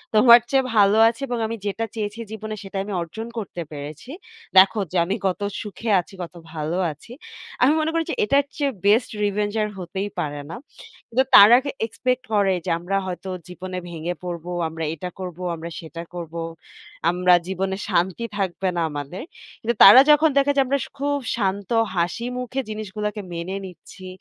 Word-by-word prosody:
তোমার 235 +2 +9
চেয়ে 270 0 +3
ভালো 205 0 +5
আছি 230 +4 -2
এবং 245 -1 -2
আমি 230 - -4
যেটা 210 +3 -2
চেয়েছি 210 0 -4
জীবনে, 215 0 -5
সেটা 195 0 -7
আমি 205 +1 -6
অর্জন 195 +7 -6
করতে 195 -5 -5
পেরেছি। 150 - -8 0.5
দেখো 190 +3 +7
যে, 185 - -1
আমি 190 +3 -1
কত 185 - -2 0.2
সুখে 220 +2 -6
আছি, 180 +3 -8
কত 170 - -9 0.2
ভালো 155 +2 -2
আছি।" 150 +10 -14 0.5
আমি 260 +4 +5
মনে 315 +1 0
করি 330 0 +1
যে, - - -2
এটার 275 +6 +3
চেয়ে 285 -2 0
বেস্ট 215 +4 +4
রিভেঞ্জ 205 0 0
আর 210 - -2
হতেই 190 +3 -4
পারে 145 -1 -3
না। 165 - -6 0.5
কিন্তু 250 +3 +3
তারা 210 +4 +10
গে, 280 - -3 0.2
এক্সপেক্ট 255 +3 -2
করে 200 -2 +3
যে, - - -2
আমরা 185 +3 -1
হয়তো 185 +1 -5 0.2
জীবনে 185 +1 -6
ভেঙে 170 +1 -4
পড়বো, 175 0 -5 0.2
আমরা 160 0 -6
এটা 180 +3 -6
করবো, 180 -1 -6
আমরা 165 +1 -7
সেটা 165 0 -8
করব। 170 -2 -7 0.8
আমরা 180 +1 +3
জীবনে 190 0 -2
শান্তি 185 +4 0
থাকবে 190 -1 -1
না 170 - 0
আমাদের। 145 +4 -6 0.4
কিন্তু 235 +2 -1
তারা 260 - +11
যখন 300 +2 +5
দেখে 280 +1 +4
যে, - - +6
আমরা 275 +2 +1
সে - - -10
খুব 285 +1 0 0.2
শান্ত 200 -3 -2 0.3
হাসিমুখে 245 +9 -2
জিনিসগুলোকে 210 0 -4
মেনে 170 +3 -4
নিচ্ছি 185 +1 -12
195 Hz, 175 wpm, -23 LUFS, 175-230 Hz, 0.8 s, তারা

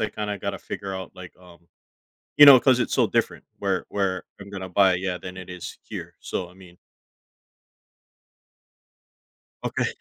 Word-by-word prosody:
I 105 - 0
kinda 105 -1 -4
gotta 100 -1 -3
figure 95 -1 -6
out, 95 -1 -7
like, 95 -1 -12
um, 85 -2 -19 0.7
you 145 - +10
know, 135 -3 +10
'cause 130 -2 +4
it's 120 - -1
so - - +3
different - - -1
where 95 -2 -1
where 95 -2 -2
I'm 100 0 -11
gonna 95 -2 -6
buy 95 0 +4
yeah, 90 0 -3
than 90 0 -9
it 95 - -9
is 90 -1 -8
here, - - -7
so, 90 - -4
I - - -17
mean 90 -1 -16 2.9
Okay, - - -1
95 Hz, 160 wpm, -24 LUFS, 90-100 Hz, 2.9 s, you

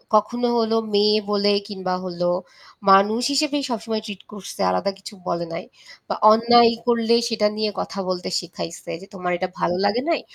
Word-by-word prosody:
কখনো 240 +3 +2
হলো 225 0 +1 0.2
মেয়ে 210 +1 +4
বলে 205 0 +3 0.2
কিংবা 185 -2 -3
হল 175 -1 -7 0.7
মানুষ 205 +5 +5
হিসেবেই 290 0 +1
সবসময় 225 -1 -3
ট্রিট 200 -3 -8
করছে 200 -2 -8
আলাদা 90 - 0
কিছু 195 - -10
বলে 170 0 -1
নাই। 165 - -5 0.4
বা - - -2 0.2
অন্যায় 235 +1 +6 0.2
করলে 235 -1 +3
সেটা 215 -2 +2
নিয়ে 215 -1 0
কথা 195 - -5
বলতে 180 -1 -3
শিখাইছে 170 -1 -8
যে, 195 - -12
"তোমার 180 -1 -3
এটা 185 +1 -3
ভালো 175 - +1
লাগে 210 +5 +1
নাই। 330 - +1
210 Hz, 170 wpm, -22 LUFS, 185-230 Hz, 0.7 s, অন্যায়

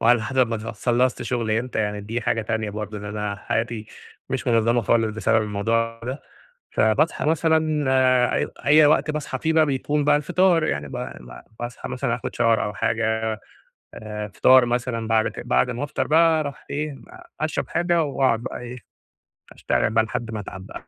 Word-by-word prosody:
وعلى 115 0 +4
حسب 130 +3 +2
ما 115 - -1
ت - - -7
خلصت 120 +3 0
شغل 120 -3 -2
إمتى، 115 +1 -1
يعني 105 -1 -1
دي 115 +4 -4
حاجة 115 0 0
تانية 110 -1 -2
برضه، 105 0 -5
إن 105 - -9
أنا 105 0 -4
حياتي 110 +1 -3 0.4
مش - - -2
من 120 - +3
منظمة 115 +1 +2
خالص 110 -1 +1
بسبب 110 0 +2
الموضوع 115 +2 -1
ده، 130 +4 -5 0.5
فباصحى 110 +9 +2
مثلًا، 155 -1 +1
آآ، 130 -1 +3
أي - - 0 0.2
أي 150 +1 +6
وقت 150 0 +3
باصحي 150 -3 -4
في 160 0 0
بقى 160 -1 +5
بيكون 145 +1 -1
بقى 145 0 +4
الفطار، 170 +3 +2
يعني 75 - -2
ب - - -12
ب - - -8 0.2
باصحي 120 0 -6
مثلًا - - -1
اخد - - -6
shower - - -2
أو 110 -3 +2
حاجة، 110 +1 -1 0.6
آآ 105 -1 -6
فطار 130 +5 +5
مثلًا 120 -2 -2
بعد 110 -1 +2
ك - - -8
بعد 125 +1 +2
ما 125 +4 -3
أفطر 145 - -2
بقى 160 +1 +4
أروح 145 -2 -6
إيه، 145 -1 -3 0.4
أشرب 155 0 -2
حاجة 170 -1 +1
وأقعد 135 -5 +1
بقي - - -5
إيه، 125 +1 -7 0.8
أشتغل - - 0
بقي 110 0 +3
لحد 115 0 -4
ما 110 - -4
أتعب 95 -1 -8
بقي، - - -10
120 Hz, 185 wpm, -23 LUFS, 110-145 Hz, 0.8 s, أي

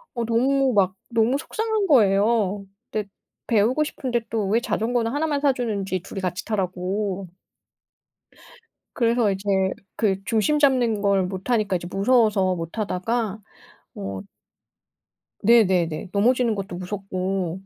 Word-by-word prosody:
어 235 -1 -1
너무 260 +3 +2
막 190 -3 +2
너무 230 +3 +2
속상한 435 +5 -2
거예요. 205 - +3 0.3
근데 210 -2 -3 0.4
배우고 235 +7 +2
싶은데 255 -5 -2
또 220 -3 -1
왜 220 +3 +3
자전거는 230 0 -1
하나만 290 0 -1
사주는지 220 -9 0
둘이 195 - -7
같이 180 0 -3
타라고. 195 -1 -2 1.7
그래서 235 -3 +2
이제 190 +1 -6 0.5
그 195 -3 0
중심 230 +8 +1
잡는 250 -7 +3
걸 200 -2 +2
못하니까 195 +2 -1
이제 175 0 -6
무서워서 200 -3 +3
못 165 -1 -6
타다가 215 +1 -2 0.6
어 95 -1 -5 1.2
네네네. 190 -7 +3
넘어지는 235 +2 +2
것도 195 -3 -5
무섭고 185 -1 -3
210 Hz, 265 characters per minute, -23 LUFS, 190-240 Hz, 1.7 s, 거예요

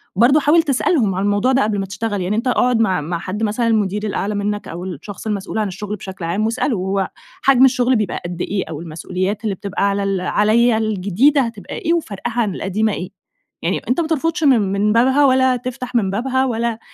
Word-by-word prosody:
برضه 245 +9 +5
حاول 310 +3 +4
تسألهم 270 - +1
عن 190 - -1
الموضوع 205 +5 +2
ده 265 +1 +3
قبل 210 -1 -1
ما 195 - -2
تشتغل، 205 +1 -3
يعني 185 +4 -1
أنتَ 235 +3 -1
اقعد 250 -1 +2
مع 190 -7 +2
مع 170 +3 -3
حد، 200 +5 -4
مثلًا 220 +2 0
المدير 210 -1 0
الأعلى 205 0 -2
منك 205 0 -2
أو 170 +2 -6
الشخص 190 +4 -7
المسؤول 205 0 -3
عن 215 -2 0
الشغل 205 +2 -5
بشكل 190 -3 -7
عام 185 +6 0
واسأله: 230 +1 0
"هو 190 +1 -1 0.3
حجم 265 -1 +5
الشغل 255 -1 +3
بيبقى 210 -5 -1
قد 175 0 -5
إيه 195 -1 -1
أو 160 0 -6
المسؤوليات 185 +6 -3
اللي 205 -3 -1
بتبقى 200 +1 -1
على 200 0 -1
ال 195 -2 -1
عَليَّ 220 +5 +3
الجديدة 220 +7 +2
هتبقى 230 -4 -5
إيه 335 - 0
وفرقها 240 - -2
عن 200 -5 -1
القديمة 210 +2 -1
إيه؟". 180 - -5 0.5
يعني 170 +3 -1
أنتَ 255 +7 +2
ما 325 - -2
ترفضش 325 +1 -1
من 230 -9 +3
من 210 +2 +2
بابها 265 +5 +4
ولا 260 -1 +4
تفتح 250 0 -6
من 210 -5 +2
بابها 260 +5 0
ولا 230 -2 -1
215 Hz, 210 wpm, -19 LUFS, 195-250 Hz, 0.5 s, برضه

